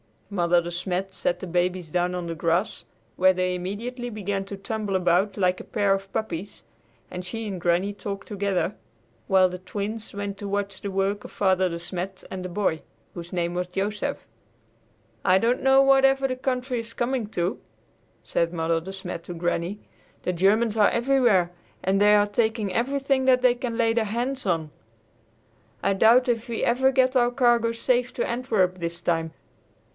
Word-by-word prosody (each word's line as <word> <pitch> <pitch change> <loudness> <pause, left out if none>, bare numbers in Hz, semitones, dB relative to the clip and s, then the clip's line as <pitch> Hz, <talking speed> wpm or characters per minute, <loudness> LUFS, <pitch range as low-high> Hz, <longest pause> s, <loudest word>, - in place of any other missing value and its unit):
Mother 175 -2 +3
De 170 0 -6
Smet 185 +2 -3
set 175 -1 -1
the - - -4
babies 180 -1 -1
down 180 +1 0
on 180 -1 -3
the 170 - -3
grass, 170 +5 -1 0.3
where 185 +1 +5
they 185 0 0
immediately 230 +7 -4
began 200 -3 -3
to 200 0 -7
tumble 210 -1 -3
about 185 +2 +2
like 185 -2 +2
a - - -7
pair 205 -3 +1
of 195 0 -4
puppies, 200 -2 -4 0.5
and 180 0 -5
she 225 +4 -5
and 190 -3 -4
Granny 175 +4 +2
talked 200 -1 -6
together, 200 -2 -1 0.5
while 190 -1 +5
the 180 0 -7
Twins 210 +4 -5
went 200 0 -4
to 205 - -6
watch 200 0 -3
the 200 - -3
work 195 +2 -1
of - - -9
Father 190 -2 +2
De 170 - -4
Smet 180 +2 -6
and 185 -1 -5
the 185 - -5
boy, 175 -4 0 0.3
whose 170 0 -8
name 175 -1 -1
was 180 0 -2
Joseph. 200 +3 -3 1.0
"I 185 - +5
don't 235 +5 +1
know 270 0 +6
whatever 270 0 +4
the 255 - -2
country 255 -1 -1
is 230 0 -7
coming 240 -2 -1
to," 175 0 -1 0.6
said 170 0 0
Mother 165 0 0
De 190 +4 -8
Smet 180 -3 -6
to 175 - -6
Granny. 175 +3 -2 0.4
"The 180 - -1
Germans 210 +5 +2
are 210 - +6
everywhere, 235 -8 +3 0.3
and 190 +1 +2
they 210 0 +6
are 205 0 +5
taking 215 -1 0
everything 270 +3 +1
that 255 -1 +5
they 250 -1 +6
can 245 -2 -4
lay 230 -2 +3
their 230 -1 +1
hands 245 +5 -2
on. 160 -4 0 1.1
I 195 - +3
doubt 230 +6 +5
if 235 0 0
we 230 -2 -3
ever 260 +3 +3
get 260 0 +2
our 240 -1 +4
cargo 240 -2 +3
safe 245 +1 0
to - - -1
Antwerp 215 -7 0
this 170 0 -4
time. 165 -2 -1
200 Hz, 180 wpm, -25 LUFS, 180-235 Hz, 1.1 s, know